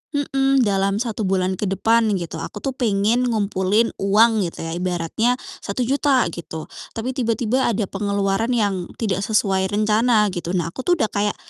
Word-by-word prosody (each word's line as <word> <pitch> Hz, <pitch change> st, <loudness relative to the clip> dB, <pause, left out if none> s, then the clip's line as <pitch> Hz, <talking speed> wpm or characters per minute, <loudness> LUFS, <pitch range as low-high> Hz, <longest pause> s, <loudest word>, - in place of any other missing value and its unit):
mhm, 270 Hz, -2 st, +2 dB
dalam 195 Hz, -1 st, +1 dB
1 220 Hz, -4 st, -3 dB
bulan 185 Hz, 0 st, +1 dB
ke 210 Hz, -, -1 dB
depan 225 Hz, +4 st, +2 dB, 0.2 s
gitu, 165 Hz, -2 st, -6 dB
aku -, -, -7 dB
tuh 270 Hz, -, -1 dB
pengen 235 Hz, 0 st, +1 dB
ngumpulin 210 Hz, 0 st, +1 dB
uang 215 Hz, +3 st, +4 dB
gitu -, -, -9 dB
ya 165 Hz, -, -4 dB
ibaratnya 180 Hz, +7 st, 0 dB, 0.3 s
Rp1.000.000 260 Hz, +4 st, +1 dB
gitu. 160 Hz, -2 st, -7 dB, 0.3 s
Tapi 230 Hz, +3 st, -3 dB
tiba-tiba 240 Hz, 0 st, 0 dB
ada 220 Hz, -1 st, 0 dB
pengeluaran 200 Hz, +2 st, -1 dB
yang 195 Hz, -6 st, 0 dB
tidak 200 Hz, -5 st, -1 dB
sesuai 195 Hz, -2 st, +1 dB
rencana 215 Hz, +2 st, +3 dB
gitu. 175 Hz, 0 st, -3 dB
Nah, 170 Hz, -1 st, -2 dB
aku -, -, -5 dB
tuh 355 Hz, -, +5 dB
udah 220 Hz, -, 0 dB
kayak 205 Hz, 0 st, 0 dB
210 Hz, 160 wpm, -21 LUFS, 195-235 Hz, 0.3 s, tuh